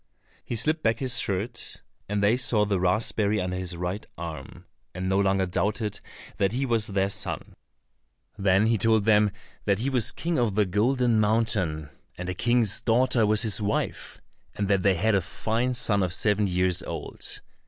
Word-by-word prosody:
He 120 Hz, -, -5 dB
slipped 155 Hz, +7 st, +1 dB
back 115 Hz, -1 st, +1 dB
his 130 Hz, -1 st, +3 dB
shirt, 105 Hz, +5 st, -3 dB, 0.3 s
and 105 Hz, -1 st, -1 dB
they 105 Hz, +4 st, +4 dB
saw 120 Hz, -4 st, +2 dB
the 100 Hz, -2 st, 0 dB
raspberry 105 Hz, +3 st, +1 dB
under 90 Hz, -1 st, -2 dB
his 90 Hz, -2 st, -4 dB
right 90 Hz, +4 st, -3 dB
arm, 85 Hz, -2 st, -8 dB, 0.3 s
and 95 Hz, 0 st, -3 dB
no 95 Hz, +1 st, +1 dB
longer 95 Hz, -1 st, +2 dB
doubted 105 Hz, +3 st, -2 dB, 0.4 s
that 100 Hz, +1 st, +1 dB
he 135 Hz, +3 st, -1 dB
was 115 Hz, -4 st, +2 dB
their 95 Hz, -1 st, 0 dB
son. -, -, -5 dB, 0.8 s
Then 95 Hz, +1 st, +2 dB
he 115 Hz, -1 st, +1 dB
told 110 Hz, 0 st, +2 dB
them 105 Hz, -1 st, +4 dB, 0.4 s
that 100 Hz, -1 st, +2 dB
he 130 Hz, +6 st, -2 dB
was 120 Hz, -3 st, +3 dB
King 170 Hz, -1 st, -2 dB
of 115 Hz, -5 st, 0 dB
the 105 Hz, -1 st, +3 dB
Golden 115 Hz, +4 st, +1 dB
Mountain, 105 Hz, -9 st, +1 dB, 0.3 s
and 90 Hz, +1 st, -5 dB
a -, -, -2 dB
king's 120 Hz, +1 st, +2 dB
daughter 120 Hz, -1 st, +2 dB
was 110 Hz, +2 st, +4 dB
his 110 Hz, -1 st, +1 dB
wife, 105 Hz, 0 st, -3 dB, 0.4 s
and 100 Hz, -, -2 dB
that 100 Hz, -2 st, +2 dB
they 95 Hz, 0 st, +3 dB
had 110 Hz, +6 st, +1 dB
a 100 Hz, -, +3 dB
fine 115 Hz, +7 st, -2 dB
son 105 Hz, -4 st, +2 dB
of 90 Hz, -1 st, 0 dB
seven 105 Hz, -1 st, +1 dB
years 90 Hz, -1 st, +1 dB
old. -, -, -5 dB
105 Hz, 180 wpm, -26 LUFS, 95-115 Hz, 0.8 s, they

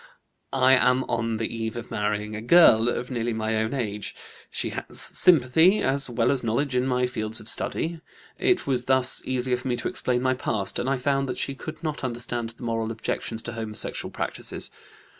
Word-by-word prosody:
"I 130 Hz, 0 st, +5 dB
am 125 Hz, 0 st, +4 dB
on 115 Hz, -2 st, -2 dB
the 115 Hz, +1 st, -3 dB
eve 110 Hz, 0 st, -3 dB
of 120 Hz, 0 st, -7 dB
marrying 105 Hz, -1 st, -2 dB
a 110 Hz, -, -5 dB
girl 120 Hz, -4 st, +6 dB
of 125 Hz, +1 st, -3 dB
nearly 120 Hz, -1 st, -1 dB
my 110 Hz, 0 st, -1 dB
own 110 Hz, +4 st, -1 dB
age. 105 Hz, -5 st, -4 dB, 0.3 s
She -, -, -3 dB
has -, -, -2 dB
sympathy 160 Hz, +4 st, +5 dB
as 135 Hz, 0 st, +3 dB
well 115 Hz, -1 st, +1 dB
as 135 Hz, -3 st, 0 dB
knowledge 125 Hz, +4 st, 0 dB
in 125 Hz, +1 st, +1 dB
my 125 Hz, -1 st, +1 dB
fields 110 Hz, -3 st, -2 dB
of 110 Hz, -, -10 dB
study; 165 Hz, +7 st, -1 dB, 0.4 s
it 370 Hz, -, +2 dB
was 125 Hz, -3 st, -1 dB
thus 130 Hz, -1 st, +2 dB
easier 130 Hz, -1 st, 0 dB
for 125 Hz, -, -7 dB
me 125 Hz, -, +1 dB
to -, -, -3 dB
explain 125 Hz, 0 st, -1 dB
my 130 Hz, 0 st, +2 dB
past, 105 Hz, -6 st, -2 dB
and 130 Hz, -, -1 dB
I 135 Hz, -, +1 dB
found 135 Hz, +1 st, 0 dB
that 125 Hz, -, -3 dB
she 140 Hz, -, -1 dB
could 155 Hz, +4 st, -9 dB
not 155 Hz, -3 st, -3 dB
understand 120 Hz, -1 st, -3 dB
the 115 Hz, +2 st, -8 dB
moral 115 Hz, -1 st, -2 dB
objections 115 Hz, 0 st, -4 dB
to 120 Hz, -, -5 dB
homosexual 110 Hz, -2 st, -3 dB
practices. -, -, -5 dB
125 Hz, 195 wpm, -25 LUFS, 115-130 Hz, 0.4 s, girl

